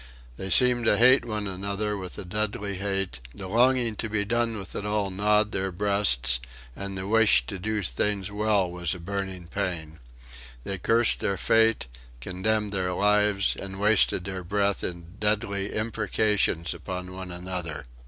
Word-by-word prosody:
They 95 +9 -6
seemed 125 +2 +5
to 105 - +4
hate 125 +4 +6
one 105 -3 -3
another 100 +2 -3
with 95 -2 -7
a - - -7
deadly 100 0 -3
hate, 95 -7 -2 0.2
The 95 - -6
longing 120 +1 +2
to 110 - -3
be 105 -1 -1
done 120 0 0
with 100 -1 -8
it - - -3
all 105 -1 -1
gnawed 105 +2 +2
their 95 -1 -2
breasts, 85 -11 +3 0.4
and 100 0 -5
the 95 +1 -4
wish 110 - +4
to 95 - -6
do 105 +2 -2
things 100 +2 0
well 105 -3 +1
was 90 -1 -2
a - - -9
burning 95 0 -5
pain. 85 -4 -4 0.6
They 95 -1 -4
cursed 115 +4 +3
their 100 - -1
fate, 115 - +3 0.3
contemned 100 - -1
their 90 -2 -1
life, 105 0 +2
and 95 0 -7
wasted 105 -3 +3
their 95 -1 -5
breath 100 +2 0
in 85 -1 -3
deadly 105 -2 -1
imprecations 105 -6 0
upon 90 +2 -6
one 95 0 -7
another. 90 -4 -5
100 Hz, 165 wpm, -26 LUFS, 90-105 Hz, 0.6 s, hate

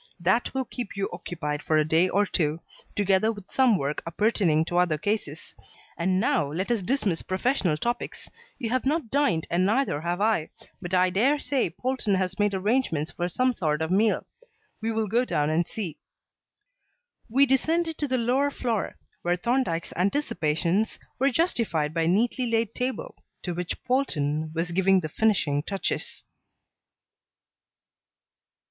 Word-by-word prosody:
That 190 +8 +2
will 265 -1 0
keep 240 -4 -6
you 195 - 0
occupied 160 -4 -4
for 155 +1 +1
a 155 - +3
day 165 +4 +3
or 205 +3 +2
two, 160 -4 0 0.4
together 200 +2 +3
with 205 -4 -11
some 255 -6 +4
work 145 -1 -2
appertaining 170 -4 +2
to 175 +1 0
other 175 -4 +2
cases. 170 -4 -3 0.4
And 185 +2 +1
now 230 - +1
let 185 +9 -2
us 230 -4 +1
dismiss 200 -5 0
professional 185 - 0
topics. 240 +9 -3 0.3
You 230 -4 -3
have 255 0 +1
not 295 -5 0
dined 200 - +2
and 175 +2 +2
neither 215 - +1
have 175 +2 -2
I, 210 -7 +1 0.3
but 180 0 -2
I 180 0 +4
dare 250 +11 +3
say 280 -3 0
Polton 250 -6 -1
has 185 0 -2
made 205 -1 +2
arrangements 190 - 0
for 175 0 -2
some 255 +7 +1
sort 155 -6 0
of 160 - -3
meal. 210 +3 +2 0.6
We 225 +1 -1
will 220 0 0
go 230 +5 +2
down 150 -10 0
and 165 +2 +1
see." 185 -9 -5 1.3
We 270 +5 +5
descended 320 +5 +1
to 295 - 0
the 260 -1 +1
lower 255 +4 +2
floor, 235 -6 -2 0.3
where 175 +1 +1
Thorndyke's 180 -4 -1
anticipations 180 - 0 0.2
were 270 +2 +4
justified 230 - 0
by 165 - 0
a - - +1
neatly 235 +7 +1
laid 230 -1 0
table 260 - -3 0.3
to 175 - -2
which 180 0 -4
Polton 155 - 0
was 170 +2 -1
giving 190 +1 +3
the 155 - -4
finishing 160 -7 +1
touches. 195 +5 -3
195 Hz, 160 wpm, -26 LUFS, 170-245 Hz, 1.3 s, We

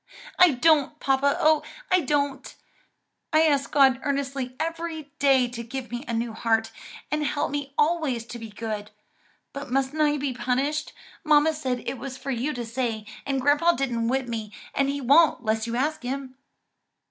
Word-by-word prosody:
"I 360 -4 +7
don't, 300 +2 +3
papa, 275 +1 +2
oh, 310 -1 +4 0.3
I 370 - +5
don't! 280 -2 -1 0.8
I 310 0 +5
ask 285 -3 +2
God 270 -3 +5
earnestly 275 -3 -2
every 325 -2 -4
day 270 -3 +4
to 240 -1 -6
give 245 +1 -6
me 240 +2 -4
a 235 - -3
new 230 0 -2
heart, 225 0 0 0.4
and 300 0 0
help 290 -1 -1
me 285 -1 -4
always 295 -7 +1
to 240 0 -8
be 225 -1 -8
good. 210 -1 -5 0.6
But 280 -1 -6
mustn't 270 +4 0
I 295 -1 +3
be 280 -2 -2
punished? 260 +5 -1 0.3
mamma 305 0 +4
said 260 -5 -3
it 265 - -4
was 260 0 -6
for 275 - -5
you 255 +4 -1
to 245 -4 -5
say, 230 -2 -3 0.2
and 275 -1 0
grandpa 290 +6 +4
didn't 240 -5 -1
whip 260 +1 0
me 220 -3 -4 0.2
and 275 0 +1
he 280 0 -2
won't 280 0 +4
'less 220 +1 0
you 235 - -3
ask 295 +5 -1
him." 260 +1 -4
270 Hz, 175 wpm, -25 LUFS, 245-295 Hz, 0.8 s, I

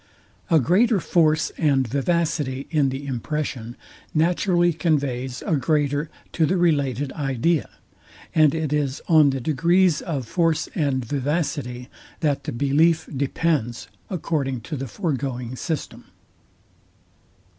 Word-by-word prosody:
A 165 -3 +5
greater 200 - +3
force 155 -2 +2
and 140 -5 +2
vivacity 140 0 -1
in 145 -4 +2
the 135 +2 -5
impression 130 -2 -4 0.4
naturally 175 +2 +2
conveys 135 -6 -1
a 160 - +1
greater 145 +1 0 0.2
to 160 -2 +2
the 185 - +1
related 145 -6 +1
idea; 140 +2 0 0.6
and 155 -2 +4
it 155 -2 -1
is 145 -2 -1
on 155 -4 +6
the 135 -1 -1
degrees 165 +5 +2
of 140 -7 -3
force 165 +2 +1
and 135 -6 0
vivacity, 140 -2 -2 0.3
that 145 -3 0
the - - -3
belief 155 +6 +2
depends, 135 -3 -1 0.2
according 145 - -2
to 155 +7 -6
the 135 -1 -4
foregoing 130 - -3
system. 155 +3 -4
145 Hz, 120 wpm, -23 LUFS, 135-165 Hz, 0.6 s, on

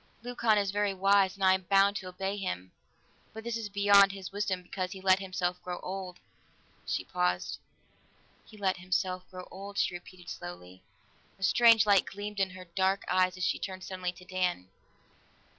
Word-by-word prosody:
"Leucon 235 -3 +2
is 200 -2 +1
very 205 -1 0
wise 195 0 +3
and 195 - -6
I 190 0 +6
am 190 - 0
bound 200 +1 +5
to 185 - -7
obey 190 +2 -3
him, 95 - -4 0.6
but 220 0 -8
this 235 0 -3
is 225 -2 -4
beyond 200 -1 +6
his 195 -1 -8
wisdom 195 -2 -2
because 185 +1 -4
he 190 - -9
let 190 0 +4
himself 180 -2 -2
grow 180 -1 -5
old." 185 -1 -6 0.7
She - - -1
paused. 90 +2 -1 0.8
"He 215 - -16
let 190 -2 0
himself 185 0 -2
grow 185 -1 -9
old," 200 +2 -8
she - - +1
repeated 175 0 -11
slowly. 90 - -8 0.6
A 195 - -9
strange 230 +2 +6
light 200 -3 +4
gleamed 205 +1 -6
in 190 -1 +2
her 185 0 -10
dark 190 +3 0
eyes 185 0 +2
as 185 - -4
she - - 0
turned 185 -1 -6
suddenly 185 -1 -3
to 180 +1 -15
Dan. 180 - -1
190 Hz, 180 wpm, -30 LUFS, 180-200 Hz, 0.8 s, I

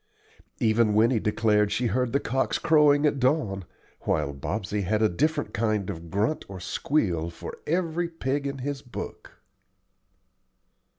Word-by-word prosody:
Even 110 -1 +3
Winnie 115 +2 +4
declared 105 -1 +2
she 125 - 0
heard 120 +2 0
the 140 - +2
cocks 130 +1 0
crowing 150 -1 +4
at 145 -2 +2
dawn, 125 - +1 0.3
while 75 -2 -1
Bobsey 100 +8 -3
had 105 +3 0
a - - +6
different 145 - -1
kind 105 -2 0
of 85 0 -9
grunt 105 - 0
or 95 -1 -7
squeal 90 - 0
for 85 - -9
every 170 0 0
pig 140 -3 -2
in 140 0 -4
his 140 +1 -4
book. 125 - -8
115 Hz, 140 wpm, -26 LUFS, 100-145 Hz, 0.3 s, a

